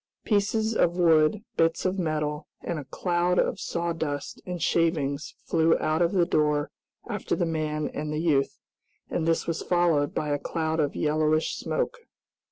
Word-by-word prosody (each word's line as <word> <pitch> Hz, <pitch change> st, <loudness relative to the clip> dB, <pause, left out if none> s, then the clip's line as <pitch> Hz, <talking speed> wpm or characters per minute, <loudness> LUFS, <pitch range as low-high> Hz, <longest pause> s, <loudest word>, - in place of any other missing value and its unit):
Pieces 220 Hz, +1 st, +1 dB
of 175 Hz, -3 st, +2 dB
wood, 165 Hz, +3 st, +4 dB
bits 165 Hz, +2 st, +2 dB
of 185 Hz, +1 st, 0 dB
metal, 150 Hz, -2 st, -2 dB
and 170 Hz, -3 st, -3 dB
a 145 Hz, -, -8 dB
cloud 175 Hz, +4 st, 0 dB
of -, -, +1 dB
sawdust 165 Hz, -5 st, -3 dB
and 180 Hz, -1 st, -4 dB
shavings 155 Hz, -3 st, 0 dB
flew 165 Hz, 0 st, +3 dB
out 155 Hz, +2 st, 0 dB
of 170 Hz, 0 st, +3 dB
the 180 Hz, -3 st, +3 dB
door 150 Hz, -3 st, +1 dB, 0.4 s
after -, -, -2 dB
the 175 Hz, -, 0 dB
man 155 Hz, -2 st, -1 dB
and 150 Hz, 0 st, -3 dB
the 150 Hz, -, -2 dB
youth, 150 Hz, -4 st, +1 dB, 0.5 s
and 165 Hz, -1 st, -1 dB
this 165 Hz, -, +1 dB
was 165 Hz, 0 st, -2 dB
followed 170 Hz, -5 st, +2 dB
by 150 Hz, -, -1 dB
a 145 Hz, 0 st, 0 dB
cloud 160 Hz, +1 st, -2 dB
of 145 Hz, -2 st, 0 dB
yellowish 155 Hz, +1 st, +1 dB
smoke. 485 Hz, -1 st, -2 dB
160 Hz, 165 wpm, -27 LUFS, 150-175 Hz, 0.5 s, wood